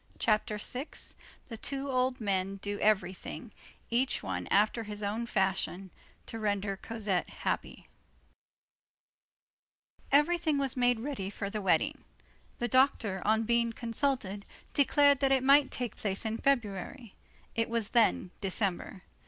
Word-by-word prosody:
CHAPTER 215 -1 +1
VI—THE 250 0 -6
TWO 275 +3 -3
OLD 255 0 +1
MEN 195 -2 -1
DO 205 0 -3
EVERYTHING, 195 -3 -1 0.4
EACH 250 +3 +1
ONE - - -3
AFTER 210 +3 +3
HIS 210 -1 -6
OWN 220 +4 -2
FASHION, 190 -2 -1 0.3
TO 225 - -6
RENDER 205 -2 -1
COSETTE 205 -4 -2
HAPPY - - -4 2.2
Everything 310 +1 +3
was 275 -3 0
made 245 -2 +2
ready 245 -8 -3
for 200 0 -5
the 215 - -3
wedding. 195 - +2 0.6
The 240 - -1
doctor, 235 -6 +2
on 220 +2 +3
being 235 0 +1
consulted, 230 -4 -1 0.3
declared 285 0 +4
that 270 -1 +2
it 265 -1 +3
might 275 +1 +6
take 245 -2 -4
place 200 +1 -3
in 220 +1 -2
February. 230 -2 -1 0.4
It 230 0 0
was 230 -2 -1
then 225 -6 +3
December. 195 -1 -2
225 Hz, 130 wpm, -31 LUFS, 200-260 Hz, 2.2 s, might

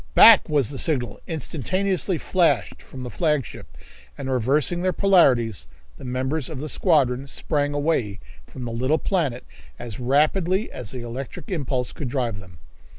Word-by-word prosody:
Back!" 225 -6 +8
was 145 -4 +1
the 135 - -3
signal 135 -7 0
instantaneously 180 +4 -1
flashed 150 - +1
from 130 -1 -10
the 125 - -6
flagship, 150 -5 -2 0.4
and 135 - -4
reversing 140 +8 +1
their 185 0 +1
polarities 125 - +3 0.3
the - - -12
members 130 +4 -2
of 155 -5 -6
the 155 +2 -5
squadron 140 -8 +1
sprang 145 0 -1
away 145 -10 0 0.3
from 125 - -8
the 120 - -4
little 130 +7 +1
planet 155 -10 -1 0.3
as 120 -3 -7
rapidly 160 - +1
as 120 -5 -7
the 125 +1 -6
electrical 125 - -6
impulse 135 -6 -2
could 135 - -5
drive 120 -6 -2
them. 90 -3 -14
140 Hz, 155 wpm, -23 LUFS, 125-160 Hz, 0.4 s, Back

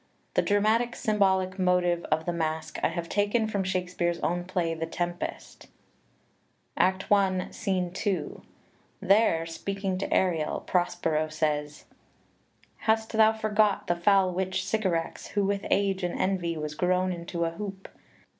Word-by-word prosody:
The - - +3
dramatic 220 +4 +2
symbolic 190 -3 +1
motive 180 -1 +2
of 160 +1 0
the 175 - -1
Masque 160 -1 -3
I - - +3
have 170 -1 -4
taken 205 +4 +1
from 205 -3 -1
Shakespeare's 180 -2 -1
own 175 +1 -1
play 175 -2 -1
"The 165 0 -4
Tempest," 175 +1 -5
xiii - - -24
xiv - - -39 0.2
PREFACE 190 - -7
Act - - -20
I, 190 -2 +2
Scene 185 -4 -1
2. 185 -5 -2 0.6
There, 195 -5 +3
speaking 195 +3 -3
to 195 - -3
Ariel, 165 -5 +1
Prospero 170 -3 0
says: 150 -1 -2 0.9
"Hast 220 0 0
thou 220 -1 +5
forgot 215 -2 +1
The 175 - +1
foul 190 +1 +3
witch 190 +1 -1
Sycorax, 185 -7 -1
who 205 -1 0
with 200 0 -1
age 195 -1 +1
and 180 -1 -2
envy 180 -3 0
Was 150 -1 -4
grown 185 +3 +1
in 170 -1 -6
to 170 -1 -1
a 165 - -1
hoop? 195 +2 -7
185 Hz, 155 wpm, -27 LUFS, 170-200 Hz, 0.9 s, thou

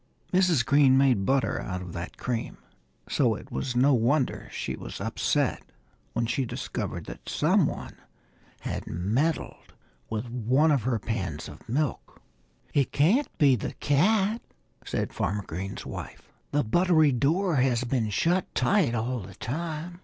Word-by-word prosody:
Mrs. 180 -9 +3
Green 140 -2 +5
made 125 -8 +3
butter 135 -6 +1
out 90 -1 -4
of 90 -2 -8
that 85 +1 -6
cream. 120 -3 -3 0.5
So - - +2
it - - -11
was 120 - -3
no 135 +3 +5
wonder 125 +3 +1
she - - -3
was - - -8
upset - - 0 0.5
when 120 - 0
she 125 +4 0
discovered 120 - -4
that - - -9
some - - +3
one - - -6 0.7
had - - -4
meddled 115 - -1 0.4
with 110 +2 -3
one 125 +6 +2
of 140 -4 +3
her 120 +1 0
pans 95 -8 -3
of 75 +8 -13
milk. 145 +4 -2 0.5
"It 140 -3 +2
can't 200 - +3
be 140 -3 +5
the 110 - -4
cat," 200 +9 +2 0.4
said - - -3
Farmer 100 +2 -1
Green's 95 +3 -6
wife. - - -8 0.2
"The 145 +1 +1
buttery 160 +4 +4
door 155 +7 +1
has 125 -2 +2
been 120 -3 0
shut 175 - +1
tight 175 - +2
all 120 +3 -1
the 100 -2 -10
time." 165 +6 -4
130 Hz, 150 wpm, -27 LUFS, 110-155 Hz, 0.7 s, Green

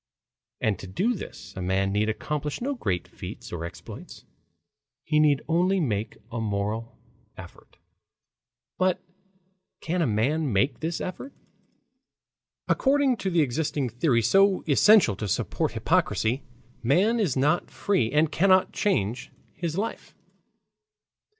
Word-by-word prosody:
And 110 -3 0
to 95 - -8
do 195 - 0
this 205 - -9
a 95 - -5
man 95 +2 0
need 105 +2 +1
accomplish 150 +5 -3
no 275 +4 -2
great 95 - -2
feats - - -9
or 85 -1 -4
exploits. 85 - -10 0.8
He 150 0 +1
need 150 -2 +3
only 180 +4 +2
make 110 - -2
a 115 -1 -3
moral 105 +2 -3 0.4
effort. - - -13 1.0
But 185 -1 +2 0.8
can 175 +2 -2
a 160 - +2
man 135 +7 0
make 120 +5 +1
this 165 +3 -3
effort? 185 +9 -6 1.3
According 275 -2 +2
to 195 - -2
the 170 -2 +3
existing 145 -1 -1
theory 120 0 +1
so 195 - +4
essential 165 - +5
to 105 - -3
support 95 - -1
hypocrisy, 120 +5 +1 0.4
man 190 - +3
is 170 - 0
not 150 +6 +1
free 185 - 0
and 150 +2 +2
cannot 185 +1 +3
change 125 - -1 0.2
his 170 -1 -4
life. 220 +3 -4
150 Hz, 130 wpm, -26 LUFS, 110-185 Hz, 1.3 s, essential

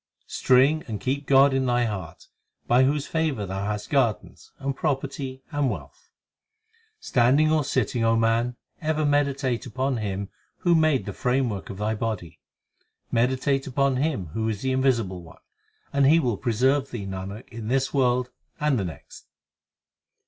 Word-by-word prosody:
String 135 +5 +3
and 110 -3 -4
keep 135 +5 -2
God 135 0 +6
in 135 -1 +1
thy 120 0 +2
heart 95 -7 -6 0.4
By 125 +2 +4
whose 145 +1 0
favour 155 -10 -1
thou 95 +1 -4
hast 105 0 -4
gardens, 130 -7 -1
and 135 0 -3
property, 135 -2 -3
and 145 -2 +1
wealth. - - -8 0.9
Standing 135 +6 +3
or 155 -1 +3
sitting, 125 -3 0
O 115 0 +3
man, 115 +2 +1 0.3
ever 155 -1 0
meditate 140 -4 0
upon 130 +1 -1
Him 100 -2 -3 0.3
Who 175 - +3
made 155 -5 +3
the - - -5
framework 125 -6 -1
of 95 - -7
thy 105 +2 -1
body. 105 -7 -4 0.7
Meditate 130 +3 +1
upon 135 0 +1
Him 130 - -1
who 110 0 -1
is 105 0 -4
the 130 - 0
Invisible 115 -9 +1
One, 80 -1 -14 0.6
And 140 -1 +4
he 160 +4 +6
will 125 -8 0
preserve 130 +5 +1
thee, 110 -5 -5
Nanak, 95 +3 -6
in 115 -1 -7
this 135 +2 0
world 125 -2 +1 0.3
and 150 -5 +2
the 95 - -1
next. 80 -6 -10
130 Hz, 155 wpm, -25 LUFS, 110-140 Hz, 0.9 s, God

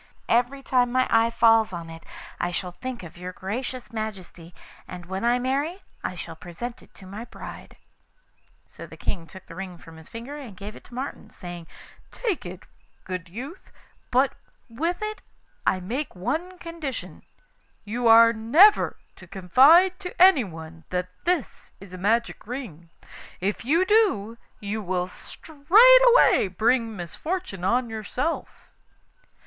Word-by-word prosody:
Every 250 +4 +1
time 250 -2 +2
my 255 +1 +3
eye 225 0 +4
falls 225 -2 +4
on 170 -2 -6
it 165 0 -11 0.4
I 175 - 0
shall 180 +1 -4
think 250 +4 -7
of 170 0 -11
your 180 +1 -6
gracious 235 +4 -5
Majesty, 190 -6 -6 0.4
and 180 -1 -9
when 190 +3 -5
I 240 +1 +3
marry 285 +9 -2 0.2
I - - -3
shall 165 -1 -7
present 235 +10 -7
it - - -21
to 190 - -13
my 205 +5 -8
bride.' - - -11 0.9
So - - -11
the - - -13
King 165 -3 -4
took 190 +2 -13
the - - -12
ring 185 0 -7
from 165 -1 -14
his 160 - -14
finger 235 +5 -8
and 240 -10 -10
gave 205 +3 -8
it - - -13
to 240 - -13
Martin, 265 +3 -6
saying: 175 -2 -9 0.4
'Take 415 - -3
it, 180 +1 -9 0.4
good 185 -2 -6
youth; 265 - -9 0.4
but 260 +2 +3 0.3
with 330 - -3
it 430 0 -4 0.5
I 185 - +3
make 240 +10 -4
one 315 - -3
condition 330 -6 -6 0.6
you 235 +3 -1
are 230 0 +8
never 295 - +5 0.2
to - - -14
confide 295 - +5
to 360 -2 -8
anyone 170 - +3
that 180 0 -2 0.2
this 350 -5 -2
is 195 -1 -13
a - - -6
magic 225 +3 0
ring. 210 - -7 0.5
If 200 +3 -2
you 330 +8 +3
do, 375 - +2 0.2
you 210 +1 -4
will 180 -2 -1
straightway 440 - +5
bring 225 +4 +1
misfortune 195 - -5
on 240 +6 +2
yourself. 225 +8 -4
230 Hz, 150 wpm, -25 LUFS, 185-280 Hz, 0.9 s, are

